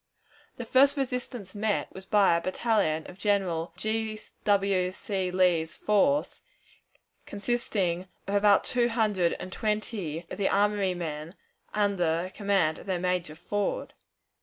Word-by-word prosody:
The 240 - -5
first 275 +5 +4
resistance 250 -6 -3
met 210 -1 -1
was 190 0 -10
by 200 -5 +4
a 170 - 0
battalion 185 -5 0
of 185 - -11
General 185 -5 0
G. 220 0 -2 0.3
W. 195 -3 +2
C. 190 -1 -3
Lee's 180 -3 +2
force, 275 +8 +2 0.9
consisting 200 -5 -1 0.2
of 195 - -4
about 205 0 +5
two 240 -1 +1
hundred 210 -7 +1
and 185 - -7
twenty 210 -7 -2
of - - -6
the 195 - +2
armory 200 -2 +2
men, 160 0 -5 0.4
under 185 -4 0
command 195 -7 +1
of - - -13
their 185 -2 0
major, 180 -3 -1
Ford. 205 +5 -2
200 Hz, 135 wpm, -28 LUFS, 180-215 Hz, 0.9 s, about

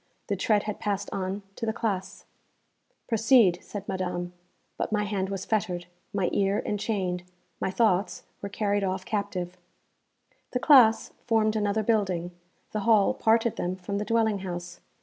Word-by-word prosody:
The 200 - +1
tread 205 +2 +2
had 210 -1 -4
passed 205 -1 -2
on 195 +1 -3
to - - -9
the - - +2
classes. 205 -5 -3 0.8
'Proceed,' 225 -5 +4
said 205 -1 -7
Madame; 180 -2 -3 0.4
but - - -3
my 210 -1 +1
hand 195 -2 -2
was 195 -1 -4
fettered, 190 -5 -1 0.3
my 195 -3 0
ear 200 0 +2
enchained, 195 -4 -1 0.4
my - - -1
thoughts 195 -1 +1 0.2
were 200 - -4
carried 205 0 0
off 190 0 -2
captive. 185 -4 -3 1.0
The 250 - +1
classes 250 -6 +6
formed 220 -2 +2
another 210 0 +1
building; 190 -6 0 0.4
the 215 - -2
hall 210 -1 +4
parted 225 0 +2
them 180 +1 -2
from 195 +2 -4
the - - -1
dwelling 220 -3 +2
house. 175 -2 -6
200 Hz, 150 wpm, -27 LUFS, 185-220 Hz, 1.0 s, classes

